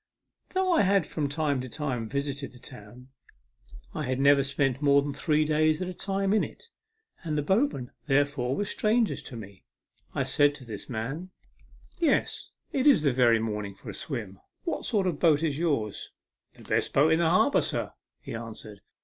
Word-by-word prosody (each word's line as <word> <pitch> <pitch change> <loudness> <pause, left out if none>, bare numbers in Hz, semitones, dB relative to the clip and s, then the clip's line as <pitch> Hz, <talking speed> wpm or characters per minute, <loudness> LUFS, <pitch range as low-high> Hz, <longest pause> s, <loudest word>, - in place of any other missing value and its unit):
Though 375 0 +2
I 325 - +4
had 195 -3 +3
from 150 -2 -2
time 145 -3 0
to 130 - -7
time 125 -6 -3
visited 140 0 -3
the - - -14
town, 125 +1 -12 0.8
I - - -3
had 130 +1 -1
never 140 0 +5
spent 135 -1 0
more 140 -1 +5
than 145 0 -3
three 150 +2 +1
days 155 +1 +2
at 185 - -3
a 185 - -4
time 195 +1 -1
in 215 - +3
it; 465 - -9 0.5
and 155 -3 -2
the 150 - 0
boatmen, 190 - +1 0.2
therefore, 135 -2 +1
were 205 - -1
strangers 220 +2 +1
to 130 - -9
rne. 100 -3 -11 0.5
I - - +1
said 145 0 +3
to 135 - -11
this 110 -4 -8
man: 110 -3 -2
A - - -3
MEMORABLE 160 +9 -6
SWIM. - - -30
63 335 - -1
" - - +5
Yes, - - 0 0.2
it 270 +1 +1
is 275 - +6
the 140 -4 +3
very 120 -2 +5
morning 105 -3 -3
for 100 - -9
a - - -10
swim. 105 -9 -6 0.2
What 340 - -3
sort 205 -5 +1
of 180 - +1
a - - -9
boat 160 -2 +3
is 150 -2 0
yours? 140 - -1 0.2
" - - -64
" - - -51
The - - -14
best - - -1
boat 150 +4 +4
in 160 - +2
the 170 -1 +3
harbour, 180 - +4
sir," - - -2 0.3
he - - -7
an 115 0 -6
swered. 105 -1 -10
145 Hz, 220 wpm, -28 LUFS, 125-170 Hz, 0.8 s, is